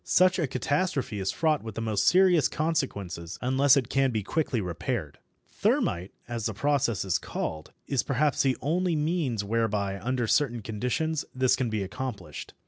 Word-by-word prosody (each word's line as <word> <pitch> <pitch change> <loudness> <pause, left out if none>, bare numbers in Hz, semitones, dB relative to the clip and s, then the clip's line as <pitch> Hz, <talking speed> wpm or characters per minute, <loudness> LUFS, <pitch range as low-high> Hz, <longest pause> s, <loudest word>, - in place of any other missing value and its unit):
Such 185 +1 +4
a 160 - +1
catastrophe 135 - -1
is 95 0 0
fraught 155 -2 +1
with 110 -2 -8
the - - -3
most 110 -3 0
serious 180 -5 +5
consequences, 100 - -2
unless 135 +2 +4
it 130 -4 +1
can 135 +1 +2
be 110 -4 -2
quickly 140 +1 -1
repaired. 90 - -3 0.3
Thermit, 90 +2 0 0.2
as 115 -2 -2
this 110 -3 -5
process 135 -6 +1
is 95 - +1
called, 80 -1 -5
is 135 -3 +1
perhaps 145 +2 +1
the 130 -2 +2
only 170 +4 +1
means 150 - 0
whereby, 100 -2 -1
under 125 +3 -1
certain 120 -1 +1
conditions, 125 +9 -1
this 130 -1 +3
can 125 -3 -1
be 110 -2 -1
accomplished. 100 - -6
125 Hz, 165 wpm, -27 LUFS, 105-145 Hz, 0.3 s, serious